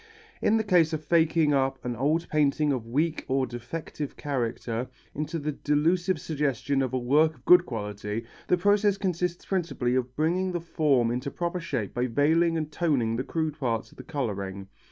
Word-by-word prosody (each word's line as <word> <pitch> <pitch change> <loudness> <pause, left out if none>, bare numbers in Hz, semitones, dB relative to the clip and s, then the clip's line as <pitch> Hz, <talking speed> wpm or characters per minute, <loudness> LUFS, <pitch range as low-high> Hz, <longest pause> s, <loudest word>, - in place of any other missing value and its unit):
In 220 - +3
the 220 - +1
case 175 -6 +3
of 155 -1 -3
faking 160 -2 +3
up 135 -1 +1
an 120 -1 -2
old 155 +7 +1
painting 150 0 +2
of 120 -4 -4
weak 155 +7 0
or 135 0 +1
defective 135 +4 -6
character, 120 -3 -2 0.2
into 155 +3 -3
the 150 -1 -2
delusive 165 +5 +1
suggestion 140 -3 -1
of 130 -2 -1
a 130 - 0
work 150 +6 +3
of - - -24
good 180 0 +7
quality, 105 -1 -4 0.2
the 180 - +3
process 205 +2 +3
consists 180 -2 -2
principally 165 -10 -1
of 130 0 -1
bringing 180 +4 +1
the 175 - -1
form 145 -8 +2
into 125 +3 -2
proper 175 +4 -3
shape 135 - -3
by 125 +1 0
veiling 160 +6 +2
and 155 -1 -3
toning 135 -10 +1
the 125 - -1
crude 155 -1 -2
parts 115 -5 -1
of - - -20
the 130 - -9
colouring. 100 -9 -4
150 Hz, 180 wpm, -27 LUFS, 125-165 Hz, 0.2 s, good